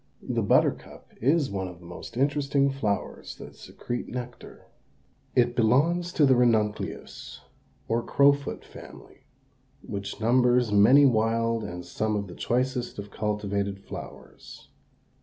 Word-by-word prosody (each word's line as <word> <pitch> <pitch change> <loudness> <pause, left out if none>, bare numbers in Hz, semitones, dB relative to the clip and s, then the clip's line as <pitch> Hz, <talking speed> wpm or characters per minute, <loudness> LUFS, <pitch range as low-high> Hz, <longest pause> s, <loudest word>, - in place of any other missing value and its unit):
The - - -1
buttercup - - 0
is 140 +1 +2
one 95 -1 -3
of 90 -1 -10
the 90 - -16
most 90 +6 -9
interesting 140 0 +1
flowers 110 -7 -3
that - - -11
secrete 120 0 -6
nectar. 125 -1 -8 0.7
It 120 0 +3
belongs 155 +10 +2
to 150 - +4
the 135 -1 +5
Ranunculus, 110 -4 -1 0.5
or 115 +1 0
crowfoot 140 +3 +2
family, - - -14 0.6
which 100 -1 -6
numbers 125 0 +3
many 115 +8 +6
wild 115 -1 +1
and 90 0 -7
some 110 0 -2
of 100 -1 -2
the 90 - -10
choicest 125 +2 -2
of 100 0 -8
cultivated 100 -2 -2
flowers. - - -11
120 Hz, 125 wpm, -26 LUFS, 105-135 Hz, 0.7 s, many